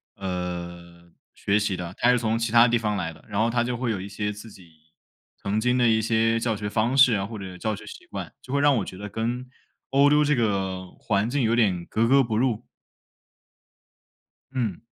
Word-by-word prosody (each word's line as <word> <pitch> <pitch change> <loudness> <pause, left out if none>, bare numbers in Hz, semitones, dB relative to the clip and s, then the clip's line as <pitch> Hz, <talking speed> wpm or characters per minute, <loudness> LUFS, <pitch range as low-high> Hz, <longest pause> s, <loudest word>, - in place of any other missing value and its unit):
呃 85 -2 -6 0.2
学 100 +1 0
习 105 -2 -1
的， 90 0 -6
他 120 - +4
是 125 - +3
从 115 -1 0
其 115 -1 -2
他 120 +1 +7
地 120 0 +2
方 105 -2 -1
来 80 - -2
的， 80 - -17
然 105 0 -1
后 115 - +2
他 120 0 +1
就 125 0 -2
会 120 0 -2
有 100 - -2
一 95 - -6
些 105 +1 -3
自 105 +2 -10
己 90 -4 -16 0.7
曾 100 +2 -1
经 125 +2 +1
的 120 -1 +4
一 110 -1 +3
些 115 +1 +2
教 115 -1 0
学 105 0 -4
方 115 +5 0
式 130 -3 +7
啊， 100 -2 0
或 110 +1 -7
者 95 -2 -8
教 110 +3 -2
学 105 +1 -12
习 - - -11
惯， - - -7
就 130 - -8
会 140 - +2
让 145 -1 +5
我 100 - -1
觉 90 - -9
得 105 +1 -7
跟 120 +4 -3 0.4
欧 140 +1 +5
洲 150 0 +5
这 150 0 +2
个 95 -5 -1
环 100 +3 0
境 145 +2 0
有 115 -1 +2
点 95 -7 +2
格 115 +1 0
格 135 +1 +5
不 110 -2 -2
入。 120 -2 0 1.9
嗯。 115 -8 -2
110 Hz, 235 characters per minute, -25 LUFS, 100-120 Hz, 1.9 s, 他